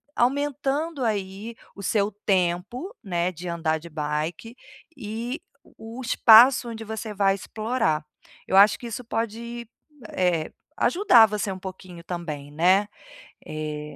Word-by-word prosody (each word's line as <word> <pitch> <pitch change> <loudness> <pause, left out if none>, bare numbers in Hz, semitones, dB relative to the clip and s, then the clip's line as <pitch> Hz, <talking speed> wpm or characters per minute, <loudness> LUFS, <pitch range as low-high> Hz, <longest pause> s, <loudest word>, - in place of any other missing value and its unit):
aumentando 285 +3 0
aí 205 0 -3 0.2
o 200 - -9
seu 205 +1 +1 0.2
tempo, 195 - -1
né, 175 -3 -1
de 180 +1 -9
andar 165 -2 0
de 170 +2 -12
bike, 155 +9 -4 0.4
e 235 +5 -5 0.2
o - - -25 0.3
o - - -5
espaço 240 +1 +6
onde 225 -1 -7
você 220 0 -5
vai 195 -1 +2
explorar. 215 -7 -1 0.4
Eu - - 0
acho 200 +2 +6
que 240 - -7
isso 235 +2 -6
pode, 235 +1 -4 0.5
eh, 175 -4 +1 0.3
ajudar 340 - +5
você 210 -1 -2
um 190 - -6
pouquinho 185 -2 -9
também 155 -5 -5
né, 185 +6 +3 0.6
eh, 150 -1 -6
205 Hz, 135 wpm, -25 LUFS, 175-235 Hz, 0.6 s, espaço